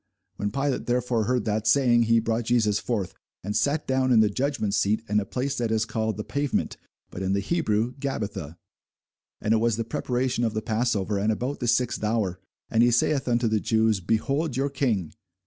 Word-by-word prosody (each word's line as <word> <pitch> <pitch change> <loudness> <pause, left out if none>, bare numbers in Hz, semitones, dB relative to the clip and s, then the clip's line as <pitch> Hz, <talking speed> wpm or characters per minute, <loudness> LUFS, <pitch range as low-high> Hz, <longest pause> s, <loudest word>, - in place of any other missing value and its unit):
When 105 - -1
Pilate 135 +4 -2
therefore 120 -2 +1
heard 125 +2 0
that 110 0 -1
saying, 125 -4 +4
he 115 0 +4
brought 115 +1 -1
Jesus 110 -4 +2
forth, 105 -6 -2 0.3
and 105 +2 -3
sat 145 +7 +1
down 130 -1 +1
in 115 - +6
the 110 -1 +4
judgment 130 -4 -1
seat 105 +2 +1
in 105 +1 +2
a 100 - -3
place 130 +6 -2
that 120 -2 0
is 110 0 +1
called 110 -1 -2
the 105 - -3
Pavement, 140 +2 -1 0.4
but 90 - -6
in 95 0 0
the 100 - +1
Hebrew, 115 - 0
Gabbatha. 100 - -4 0.8
And 105 - +1
it - - +4
was 115 0 +1
the 115 - -1
preparation 125 +2 -1
of 115 -2 -1
the 110 - -1
passover, 110 -3 0
and 105 +2 +1
about 125 +6 -3
the 120 - -2
sixth 120 -1 +1
hour: 105 -4 0 0.3
and 115 - +2
he 120 - +5
saith 130 +3 +1
unto 120 -1 +2
the 110 -1 +1
Jews, 110 -1 +2
Behold 135 - -1
your 140 +1 0
King! 115 - -1
115 Hz, 200 wpm, -25 LUFS, 105-125 Hz, 0.8 s, in